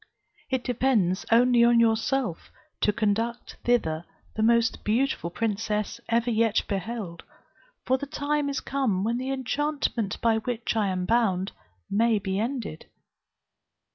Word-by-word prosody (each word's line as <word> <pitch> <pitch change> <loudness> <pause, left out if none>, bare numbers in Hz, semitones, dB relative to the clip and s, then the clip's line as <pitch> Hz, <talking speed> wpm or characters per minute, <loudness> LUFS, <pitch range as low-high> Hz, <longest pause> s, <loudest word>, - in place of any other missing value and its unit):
It 260 -2 -1
depends 225 -7 +1
only 240 +1 +5
on 235 0 +5
yourself 230 -3 +1 0.3
to 210 - +3
conduct 225 +2 -1
thither 170 -10 +1 0.3
the 220 - -1
most 230 +1 +3
beautiful 225 -4 0
princess 210 +2 -2
ever 235 +1 +2
yet 225 -1 +2
beheld, 200 -2 -4 0.6
for 260 +1 +2
the 285 - -5
time 290 0 -1
is 280 - -2
come 255 -9 0
when 230 +3 0
the 260 +1 -3
enchantment 270 -5 -1
by 225 -1 +2
which 235 0 -3
I 215 -2 +2
am 185 -1 -1
bound 195 -4 +1 0.4
may 225 +2 +2
be 190 -1 -2
ended. 230 - -4
230 Hz, 135 wpm, -26 LUFS, 205-250 Hz, 0.6 s, only